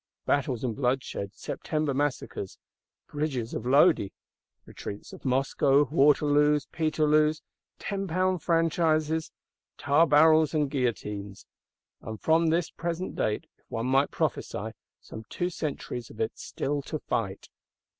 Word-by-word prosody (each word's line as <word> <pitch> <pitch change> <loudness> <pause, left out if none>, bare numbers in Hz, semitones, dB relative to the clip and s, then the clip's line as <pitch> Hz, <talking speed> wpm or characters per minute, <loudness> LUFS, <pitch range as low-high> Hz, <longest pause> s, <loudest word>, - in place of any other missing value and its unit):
Battles 135 -4 0
and 120 -4 -1
bloodshed, 125 -6 -2
September 155 -3 -2
Massacres, 135 -8 -3 0.5
Bridges 140 -6 -3
of 120 - -4
Lodi, 140 - +5 0.6
retreats 100 - -8
of - - -12
Moscow, 135 +2 +3
Waterloos, 150 -1 +4
Peterloos, 155 -1 +2 0.3
Tenpound 185 -2 -1
Franchises, 160 -1 +1 0.5
Tarbarrels 155 +1 +4
and 145 -3 +1
Guillotines;—and 105 -3 -5
from 165 +1 +3
this 165 +1 +1
present 170 +2 -4
date, 105 - -1
if - - -37
one 115 +1 -3
might 135 +2 +3
prophesy, - - -2 0.3
some 110 - -10
two 180 +1 -2
centuries 135 -7 -5
of 110 - -13
it 110 - 0
still 145 +1 -3
to - - -4
fight! - - -3
145 Hz, 115 wpm, -28 LUFS, 130-160 Hz, 0.6 s, Lodi